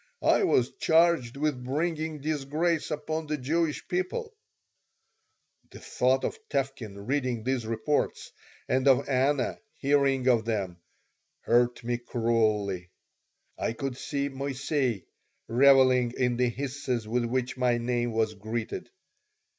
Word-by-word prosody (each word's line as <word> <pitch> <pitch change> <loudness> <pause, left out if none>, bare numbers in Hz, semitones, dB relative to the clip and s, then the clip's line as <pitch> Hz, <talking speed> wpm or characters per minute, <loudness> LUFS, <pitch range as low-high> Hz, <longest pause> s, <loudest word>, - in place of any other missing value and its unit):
I - - +4
was 125 0 +2
charged 160 -7 +3
with 145 -4 -1
bringing 155 +2 -2
disgrace 155 +3 -1
upon 155 +1 -3
the 150 0 -1
Jewish 155 +3 -1
people 185 - -3 1.3
The - - -12
thought 130 +1 +1
of - - -3
Tevkin 120 -8 -3
reading 130 -4 -1
these 125 -2 -1
reports 115 +6 -1 0.4
and 130 +1 +1
of 135 0 +4
Anna 135 0 +1 0.2
hearing 135 -2 +2
of 120 -3 +4
them 100 -6 -2 0.6
hurt 120 0 +2
me 120 0 -1
cruelly. 110 -6 0 0.7
I - - -1
could 135 +2 -4
see 140 +1 -2
Moissey 135 - -2 0.4
reveling 130 -1 +5
in 125 -1 +1
the 125 0 +2
hisses 125 -2 -3
with 120 +2 0
which 125 +1 -1
my 125 -2 +2
name 120 0 -1
was 110 -1 0
greeted. 110 +2 -5
130 Hz, 125 wpm, -28 LUFS, 120-145 Hz, 1.3 s, reveling